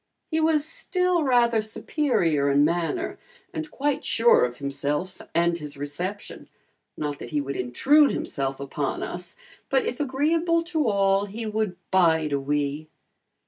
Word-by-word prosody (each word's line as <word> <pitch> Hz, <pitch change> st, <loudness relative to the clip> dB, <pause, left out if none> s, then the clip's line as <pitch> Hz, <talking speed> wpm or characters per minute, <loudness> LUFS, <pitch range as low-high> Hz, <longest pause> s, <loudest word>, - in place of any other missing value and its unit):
He 320 Hz, -, +1 dB
was 315 Hz, -2 st, +2 dB
still 365 Hz, -5 st, 0 dB
rather 240 Hz, -5 st, +3 dB
superior 210 Hz, -, 0 dB
in 140 Hz, +1 st, +4 dB
manner 175 Hz, -, -1 dB, 0.3 s
and 315 Hz, -2 st, -4 dB
quite 290 Hz, 0 st, -1 dB
sure 235 Hz, +1 st, +4 dB
of 120 Hz, 0 st, -6 dB
himself 145 Hz, +5 st, -3 dB
and 170 Hz, 0 st, +3 dB
his 150 Hz, -2 st, -8 dB
reception, 175 Hz, +9 st, -6 dB, 0.5 s
not 145 Hz, -1 st, -3 dB
that -, -, -7 dB
he 150 Hz, -, 0 dB
would 140 Hz, -1 st, -4 dB
intrude 275 Hz, -, +4 dB
himself 135 Hz, -1 st, -3 dB
upon 140 Hz, -1 st, -3 dB
us, -, -, -5 dB, 0.3 s
but -, -, +2 dB
if 460 Hz, -, -3 dB
agreeable 325 Hz, +5 st, +1 dB
to 320 Hz, -5 st, 0 dB
all 195 Hz, -1 st, +2 dB
he 225 Hz, +3 st, -6 dB
would 215 Hz, -4 st, -2 dB
"bide 160 Hz, -4 st, +3 dB
a 140 Hz, -, +1 dB
wee." 145 Hz, +2 st, -2 dB
195 Hz, 145 wpm, -25 LUFS, -, 0.5 s, in